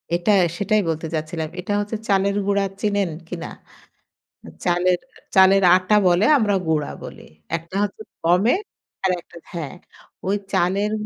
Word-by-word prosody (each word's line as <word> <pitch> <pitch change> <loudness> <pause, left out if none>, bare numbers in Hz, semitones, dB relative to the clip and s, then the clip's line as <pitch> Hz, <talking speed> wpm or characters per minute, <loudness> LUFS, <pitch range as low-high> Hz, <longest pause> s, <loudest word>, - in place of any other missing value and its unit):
এটা 175 +5 +1 0.3
সেটাই 210 +1 +2
বলতে 160 0 -2
চাচ্ছিলাম। 155 0 -3
এটা 185 +3 -3
হচ্ছে 205 +2 -3
চালের 200 0 +2
গুঁড়া 200 0 +2 0.2
চিনেন 205 -3 +1 0.2
কিনা? 170 -1 -6 1.2
চালের 180 0 +2 0.4
চালের 190 +1 +6
আটা 185 +3 +2
বলে 180 +3 +4
আমরা 210 -4 +1
গুঁড়া 155 -2 0
বলি। - - -9 0.3
একটা 165 +2 -12
হচ্ছে 205 +1 -3 0.2
গমের 190 - +3 0.4
আরেকটা 180 -2 -2 0.2
হ্যাঁ। 165 -3 -5 0.5
ওই 195 +2 +2 0.2
চালের 200 +4 +1
185 Hz, 130 wpm, -22 LUFS, 175-205 Hz, 1.2 s, চালের